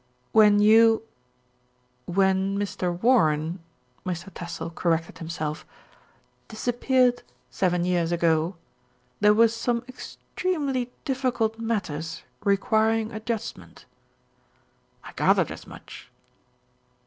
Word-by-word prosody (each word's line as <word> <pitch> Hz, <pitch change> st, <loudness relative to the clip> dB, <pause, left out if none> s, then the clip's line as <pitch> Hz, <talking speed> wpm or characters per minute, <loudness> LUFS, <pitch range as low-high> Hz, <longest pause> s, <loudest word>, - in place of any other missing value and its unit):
"When 210 Hz, -2 st, +6 dB
you 225 Hz, +1 st, +5 dB, 1.0 s
when 190 Hz, +1 st, +1 dB
Mr. 195 Hz, -3 st, -2 dB
Warren," 165 Hz, -8 st, +3 dB, 0.4 s
Mr. 185 Hz, +1 st, -5 dB
Tassell 170 Hz, -1 st, -6 dB
cor 170 Hz, 0 st, +1 dB
rected 165 Hz, 0 st, -4 dB
himself, 160 Hz, -2 st, -4 dB, 0.8 s
"disappeared 245 Hz, +2 st, +1 dB, 0.3 s
seven 175 Hz, +5 st, 0 dB
years 175 Hz, -2 st, 0 dB
ago, 165 Hz, +1 st, +1 dB, 0.6 s
there 210 Hz, 0 st, +5 dB
were 230 Hz, +1 st, +6 dB
some 235 Hz, +1 st, -2 dB
extremely 270 Hz, -1 st, -3 dB
difficult 245 Hz, -4 st, -1 dB
matters 165 Hz, -9 st, -3 dB, 0.2 s
requiring 220 Hz, +2 st, +2 dB
adjust 220 Hz, 0 st, -4 dB
ment." -, -, -16 dB, 1.2 s
"I -, -, -10 dB
gathered -, -, +2 dB
as -, -, -9 dB
much." -, -, -12 dB
210 Hz, 95 wpm, -25 LUFS, 175-230 Hz, 1.2 s, When